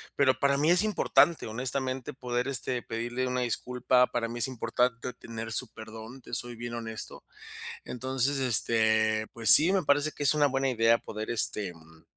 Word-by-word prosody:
pero 130 -2 +2
para 140 0 +2
mí 150 +3 +1
es 175 +3 +5
importante, 190 - +2
honestamente, 130 +2 -3
poder, 125 -1 -3
este, 130 -2 -2
pedirle 120 +3 -4
una 125 0 -2
disculpa. 125 +1 +1
Para 120 -1 -3
mí 120 +1 -7
es 120 - 0
importante 125 0 -2
tener 115 -1 -8
su 120 +2 -3
perdón, 110 +3 -11
te 120 - -14
soy 120 0 -4
bien 120 +1 -7
honesto. 110 -1 -8 0.6
Entonces, 130 +2 -2
este, 110 -3 +2
pues 115 -3 +4
sí, 165 +5 +7
me 195 - +2
parece 145 +1 +1
que 145 - -6
es 140 - +4
una 150 -1 +3
buena 135 0 -1
idea 115 -2 +3
poder, 110 0 -7
este, 105 -3 +1
em, 80 -1 -17
125 Hz, 180 wpm, -28 LUFS, 115-130 Hz, 0.6 s, sí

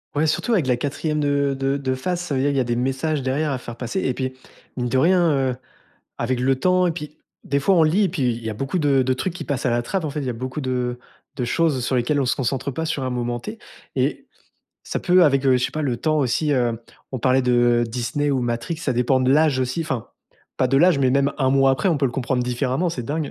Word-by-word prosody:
Ouais, 155 +2 +2
surtout 160 +10 0
avec 190 - +2
de - - -3
la 125 - +4
4e 150 +3 -2
de 140 -1 +1
de 135 +1 0
de 130 -2 -2
face, 175 +7 -2
ça 165 -5 -3
veut 130 - +1
dire 140 - +2
il 140 - -1
y - - +3
a 130 - +1
des 120 0 -1
messages 135 +4 -1
derrière 140 +4 -1
à 135 - -1
faire 120 -2 -9
passer 125 +10 -3
et 130 - 0
puis, 130 0 -3 0.4
mine 125 -1 -2
de 130 - +1
rien, 175 +3 +4 0.2
heu, - - -5 0.6
avec 125 +1 -1
le 135 +1 +3
temps 185 +2 +3
et 170 - +1
puis 150 -2 -8 0.3
des 140 - 0
fois 195 +8 +3
on 165 - +5
lit 170 +7 +3
et - - +2
puis 165 -5 -3
il 115 0 -5
y 110 - -2
a - - -3
beaucoup 135 - -2
de 145 -4 +3
de 130 0 +1
trucs 170 +8 -3
qui 180 - -7
passent 140 -3 -3
à 130 - +2
la 120 0 +1
trappe, 165 +9 -3
en 155 - -2
fait. 150 +1 -4
Il 135 - -4
y - - -2
a 125 - -2
beaucoup 130 +5 -5
de 125 -2 -2 0.4
de 125 - -1
choses 150 -1 +1
sur 130 +2 0
lesquelles 135 +4 +1
on 135 - 0
se 120 - +1
concentre 135 +1 -1
pas 160 +5 -3
sur 155 -4 -2
un 130 - -2
moment 120 -1 -2
T 215 - -7 0.4
et - - -1 0.6
ça - - -3
peut, 180 -1 +4
avec, 140 -4 +3
je 130 -2 +5
sais 125 - -1
pas, 155 - -4
le 130 -5 0
temps 155 +5 0
aussi 145 +3 +1
heu, 120 -4 +1 0.4
on 130 - -3
parlait 130 +2 +3
de 120 -1 +3
Disney 125 +5 -1
ou 130 - +1
Matrix 120 +6 -2
ça 150 -5 -1
dépend 125 +2 +2
de 130 0 +2
l'âge 145 -2 +3
aussi. 130 +6 -1
Enfin, 135 -8 -4 0.5
pas 130 - +2
de 135 +2 +1
l'âge, 170 +1 +5
mais 130 -2 +3
même 140 +1 +2
un 130 -2 +2
mois 135 0 +4
après, 135 +9 +1
on 170 - +2
peut 140 - 0
le - - -2
comprendre 125 0 -1
différemment. 125 +7 -1
C'est 125 -7 -5
dingue. 150 +4 -3
135 Hz, 280 wpm, -22 LUFS, 125-150 Hz, 0.6 s, on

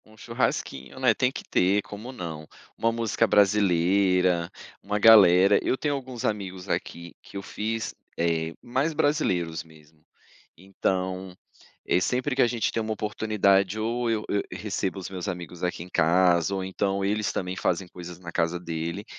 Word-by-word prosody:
Um 110 0 -19
churrasquinho, 115 - -3
né, 130 -3 +4
tem 125 +3 +1
que - - -7
ter, 95 +3 +2
como 105 +5 -8
não, 80 -9 -7 0.3
uma 115 - +1
música 115 0 0
brasileira, 95 -3 +3 0.3
uma 105 - -2
galera, 100 -3 +7
eu 130 - +1
tenho 145 +1 -1
alguns 130 -3 -5
amigos 95 -3 -3
aqui 85 0 -4
que - - -10
eu 100 - -5
fiz, 110 +2 -3 0.2
eh, 80 -1 0
mais 130 +7 0
brasileiros 95 - 0
mesmo. 80 -1 -21 0.5
Então, 95 0 -3 0.5
eh, 90 - +2
sempre 130 +6 0
que 135 - +3
a - - +5
gente 115 -2 -1
tem 115 - -1
uma 110 0 -2
oportunidade 105 -1 +1
ou 115 +2 -1
eu 110 -2 -1
eu 100 - +1
recebo 100 -2 -3
os 90 - -6
meus 95 -1 -6
amigos 90 -2 -6
aqui 90 -2 -2
em 90 - -13
casa, 85 +2 +3
ou 95 - -2
então 95 +1 -1
eles 105 0 0
também 90 0 -3
fazem 90 +1 -1
coisas 90 -1 -9
na 85 -2 -8
casa 85 +1 0
dele, 85 +3 -4
95 Hz, 165 wpm, -26 LUFS, 90-110 Hz, 0.5 s, galera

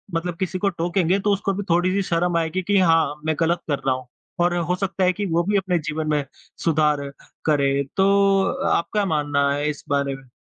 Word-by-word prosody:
मतलब 165 +1 -2
किसी 190 -1 -2
को 200 - +2
टोकेंगे, 175 +1 0
तो 205 +1 +1
उसको 195 0 -1
भी 205 +2 -3
थोड़ी-सी 185 +3 +2
शर्म 170 0 +1
आएगी 165 +3 -1
कि 200 +2 +1
हाँ, 165 -5 +3
मैं 160 -1 +1
गलत 170 +1 +1
कर 145 -3 -1
रहा 130 - +2
हूँ, 130 -1 -9 0.3
और 175 0 +2
हो 175 +1 0
सकता 195 0 -2
है 185 0 +3
कि 205 +3 -3
वो 170 -2 +1
भी 205 +3 +1
अपने 190 -2 0
जीवन 155 0 -3
में 150 -1 +1 0.4
सुधार 150 -3 +1 0.3
करें। 140 -2 +2
तो 195 0 +4 0.3
आपका 205 +4 0
मानना 145 -4 +1
है 145 +1 0
इस 150 - -6
बारे 140 -1 0
में? 135 -1 -15
170 Hz, 205 wpm, -22 LUFS, 150-190 Hz, 0.4 s, तो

